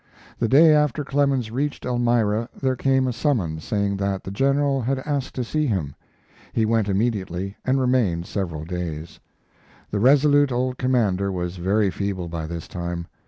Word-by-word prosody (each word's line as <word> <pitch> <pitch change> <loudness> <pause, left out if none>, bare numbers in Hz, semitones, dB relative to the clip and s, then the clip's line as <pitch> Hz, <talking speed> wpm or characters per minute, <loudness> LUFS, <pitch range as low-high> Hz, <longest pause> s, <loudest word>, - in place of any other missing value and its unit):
The 115 - +1
day 155 +6 +7
after 150 -1 +1
Clemens 135 -5 +1
reached 140 +4 -2
Elmira 120 -2 +1
there 130 -1 0
came 130 +1 +2
a 125 - -1
summons 100 - -1
saying 100 -2 -1
that 100 -1 -2
the 95 - -6
General 135 +4 +1
had 135 +3 0
asked 140 -3 -2
to 125 - -1
see 155 +5 -1
him. 85 - -1 0.6
He 110 - +2
went 110 -2 +1
immediately, 100 -2 -1
and 130 +1 +1
remained 120 -10 +1
several 85 -7 -4
days. 85 -2 -5 0.7
The 100 - -1
resolute 145 +3 +4
old 125 +1 -1
commander 105 -7 +1
was 90 -1 -4
very 100 +3 +1
feeble 95 -1 -3
by 80 -1 -4
this 85 -1 -6
time. 85 -1 -4
110 Hz, 165 wpm, -23 LUFS, 95-130 Hz, 0.7 s, day